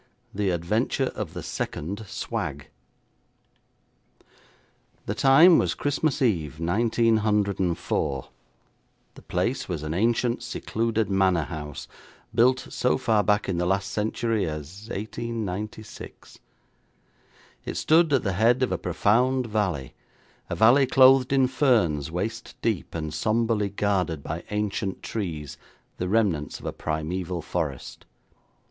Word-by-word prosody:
The 100 -1 0
Adventure 90 +6 0
of - - -6
the - - -5
Second 100 +8 -4
Swag - - -4 2.4
The 100 - -2
time 140 +9 +6
was - - 0
Christmas 145 0 0
Eve, 80 - 0
1904. 100 - +1 0.9
The - - -14
place 95 +8 -2
was 80 -4 -3
an 75 0 -3
ancient, 115 +5 +1
secluded 115 -1 -1
manor 95 -4 +3
house, 75 -3 -7 0.5
built 130 +2 +3
so 125 - +1
far 110 -5 +2
back 105 0 +1
in 90 -3 -1
the 90 - 0
last 95 0 0
century 110 -1 -1
as 80 +7 -7
1896. 110 -1 -6 1.2
It - - -5
stood 160 0 +4
at 135 -4 +3
the 95 - -1
head 120 +6 +3
of 130 - 0
a - - -1
profound 125 +4 +2
valley; 95 - -2 0.6
a - - -2
valley 125 +5 +5
clothed 130 0 +6
in 135 -1 +4
ferns 115 - +2
waist 110 +7 -4
deep, 110 -7 -1
and 80 -2 -4
sombrely 110 +3 +1
guarded 95 -7 -1
by 80 +3 -5
ancient 105 -2 -2
trees, 80 -10 -5 0.4
the 90 - -2
remnants 95 -9 0
of - - -12
a - - -3
primeval 85 +2 -3
forest. 75 -8 -4
105 Hz, 120 wpm, -25 LUFS, 85-115 Hz, 2.4 s, time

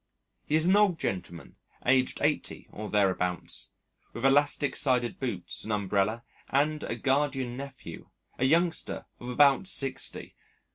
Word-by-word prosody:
He 150 - +1
is 160 +1 +4
an 185 +2 +4
old 205 -5 +4
gentleman 85 - -5 0.3
aged 130 0 +2
eighty - - -1
or 105 0 -7
thereabouts, 90 -4 0 0.4
with 120 - -4
elastic 145 +1 +3
sided 125 -3 +1
boots, 115 -10 -4
an 110 - -5
umbrella, 105 +2 0 0.3
and 150 +3 +1
a - - -3
guardian 135 -2 0
nephew 130 -10 -9 0.3
a 130 - +2
youngster 165 +4 +1
of 120 - -7
about 140 +7 +4
sixty. 135 -7 0
130 Hz, 135 wpm, -28 LUFS, 105-145 Hz, 0.4 s, is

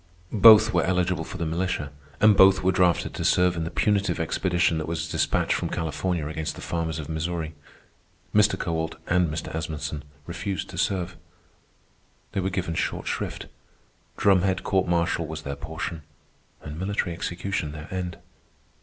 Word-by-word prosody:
Both 110 0 +8
were 85 -2 +3
eligible 90 -1 +1
for 95 - -8
the 85 - -2
militia, 80 -3 -2 0.3
and 105 -1 +6
both 95 0 +6
were 95 - +4
drafted 90 -2 +2
to - - -4
serve 90 -1 +3
in 85 -1 -2
the - - -3
punitive 100 -1 +1
expedition 85 0 +1
that 80 - -4
was 80 0 -2
despatched - - +1
from - - -2
California 80 +1 -2
against 80 0 -4
the - - -9
farmers 80 -2 -2
of 75 -2 -5
Missouri. 80 0 -3 0.8
Mr. 105 0 +4
Kowalt 80 -1 -2
and 90 -2 +2
Mr. 75 0 -5
Asmunsen 75 -2 -4 0.2
refused 90 0 -4
to - - -8
serve. 90 -3 -1 1.1
They - - -2
were 95 0 0
given 90 -3 -2
short 80 - -2
shrift. - - -3 0.7
Drumhead 95 -1 +3
court 95 -2 +1
martial 85 -1 +1
was 80 0 -6
their 70 -1 -4
portion, 80 +3 -5 0.6
and 75 +2 -7
military 95 -2 -1
execution 85 -1 -3
their 75 +1 -8
end. 90 -2 -3
85 Hz, 160 wpm, -25 LUFS, 80-95 Hz, 1.1 s, Both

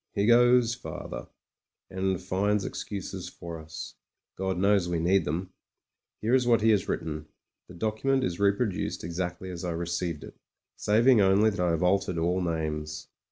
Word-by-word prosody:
He 100 -1 +2
goes 120 0 +5
farther, - - -7 0.6
and 95 -1 -1
finds 100 +2 0
excuses 95 -2 -5
for 85 -2 -8
us; 80 0 -8 0.4
God 95 -1 -2
knows 100 -1 +3
we 85 - 0
need 95 +4 +2
them. 90 +5 -3 0.7
Here 115 +3 +1
is 130 -2 +3
what 115 -3 +4
he 110 +1 +5
has 105 -3 +1
written. 75 -1 -3 0.4
The 90 - -12
document 110 +7 0
is 90 -6 -2
reproduced 100 0 0
exactly 90 +2 -4
as 85 -1 -7
I 90 -2 -2
received 85 -2 -3
it - - -11 0.3
— - - -63
saving 115 +2 +5
only 100 +3 +4
that 100 - -6
I 90 -1 +2
have 85 0 0
altered 90 -1 +1
all 90 +3 +1
names. 75 -3 -3
95 Hz, 165 wpm, -28 LUFS, 85-105 Hz, 0.7 s, goes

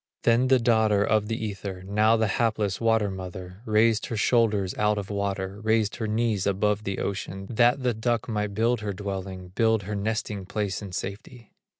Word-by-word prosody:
Then 120 +2 +4
the 130 0 +5
daughter 110 -4 +3
of 105 0 +1
the 115 0 -2
Ether, 100 -2 -6
Now 105 +3 +3
the 110 - +2 0.2
hapless 105 -4 0
water 110 -3 +2
mother, 90 0 -8
Raised 110 +1 +3
her 115 - -3
shoulders 105 -4 +2
out 105 0 +2
of 100 0 -4
water, 100 -1 -3
Raised 110 -1 +1
her 110 -3 -2
knees 110 -2 0
above 105 +2 +1
the 100 -1 -2
ocean, 95 -1 -4
That 120 +3 +3
the 125 -1 +2
duck 115 +2 -1
might 105 -3 -2
build 115 +2 +2
her 105 -1 -3
dwelling, 95 -2 -5
Build 110 +2 +2
her 105 +3 -5
nesting 105 -1 -3
place 100 -1 -2
in 100 -2 -7
safety. 100 +5 -7
105 Hz, 185 wpm, -26 LUFS, 100-115 Hz, 0.2 s, the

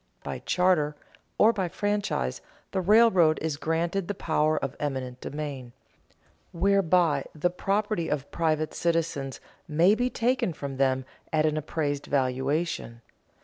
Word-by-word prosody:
By - - -5
charter 180 -5 +2 0.4
or 225 +2 +5
by 190 -4 -1
franchise 205 - -1 0.3
the 190 - 0
railroad 190 -5 +5
is 160 -2 -2
granted 170 +5 -1
the 205 - -3
power 155 -3 +1
of 135 -1 -3
eminent 130 -3 -4
domain, 140 -5 -6 0.8
whereby 175 -6 +2
the 175 +4 0
property 195 -1 -1
of 145 -2 -3
private 155 -2 0
citizens 165 -5 -1 0.3
may 165 +5 +4
be 245 +3 +1
taken 245 -7 0
from 140 -3 -6
them 130 -1 +1 0.3
at 155 -1 +2
an 155 -1 +1
appraised 145 -2 -2
valuation. 135 -1 -1
155 Hz, 130 wpm, -27 LUFS, 140-185 Hz, 0.8 s, or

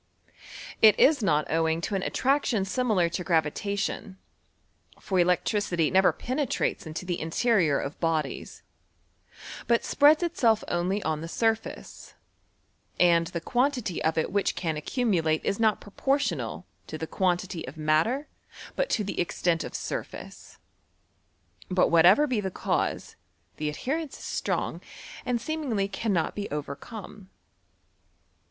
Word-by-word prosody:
it 215 -1 +7
is 290 -2 +5
not 155 -7 +2
owing 160 0 +1
to 185 - -4
an 195 - 0
attraction 260 -4 +1
similar 215 -5 +1
to 175 +2 -4
gravita 170 +4 0
tion; 195 0 -3 0.8
for 190 -2 -1
electricity 180 -1 +1
never 190 0 +5
penetrates 255 - -2
into 160 +3 -6
the 175 -1 -3
interior 165 - +2
of 140 - -5
bodies, 160 -5 -2 1.0
but 235 0 +2
spreads 300 +3 +5
itself 235 -10 +2
only 180 +4 -1
on 155 -1 -1
the 165 - -5
surface, 225 +5 -3 0.8
and 170 -1 +4
die 170 - -3
quantity 245 - -1
of 160 0 +1
it 160 - 0
which 200 0 0
can 160 -3 -2
accumulate 165 - 0
is 200 - 0
not 220 -2 +3
pro 205 - -14
portional 165 - -1 0.2
to 155 - -6
the 160 - -4
quantity 180 0 -1
of - - -9
matter 160 - +1 0.5
but - - 0
to 215 - +1
the 200 - -4
extent 175 -1 0
of - - -7
surface. - - -6 1.1
But 185 -1 +3
whatever 175 - +6
be 250 -7 -1
tlie 190 -2 -4
cause, - - -2 0.4
the 150 0 -2
adhe 150 - -8
jHon 310 +3 -1
is - - -12
strong, - - -3 0.5
and 245 -1 +1
seemingly 245 -7 -2
cannot 195 -3 -1
be 205 -1 -5
overcome. 185 - -7
190 Hz, 135 wpm, -27 LUFS, 165-230 Hz, 1.1 s, it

